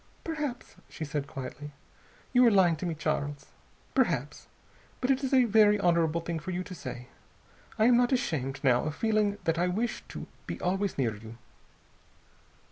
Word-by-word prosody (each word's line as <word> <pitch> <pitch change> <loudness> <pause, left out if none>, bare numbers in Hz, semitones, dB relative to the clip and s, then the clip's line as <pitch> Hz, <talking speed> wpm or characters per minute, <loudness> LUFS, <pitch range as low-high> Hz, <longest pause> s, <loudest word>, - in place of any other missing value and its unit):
"Perhaps," 300 -6 -4
she 160 - -6
said 145 -1 -3
quietly, 135 +2 -7 0.6
"you 250 0 +6
are - - +8
lying 190 -5 +4
to 175 - -3
me, 165 - -2
Charles. 145 -2 -3 0.4
Perhaps. 165 - 0 0.5
But 255 +1 +1
it 270 +1 +1
is 265 - -1
a 260 -2 +6
very 210 -2 +5
honorable 170 -3 +2
thing 165 -1 -3
for 165 - -7
you 180 0 -2
to 185 +1 -9
say. 125 -6 -8 0.7
I 220 - +4
am 240 0 +6
not 245 +1 +3
ashamed, 135 - -1
now, 125 -1 +3
of 155 -1 -3
feeling 215 -1 +1
that 165 0 0
I 175 - +2
wish 215 +7 -2
to - - -7 0.2
be - - -5
always 195 +2 -1
near 120 -6 0
you." 110 +2 -11
175 Hz, 175 wpm, -29 LUFS, 145-220 Hz, 0.7 s, are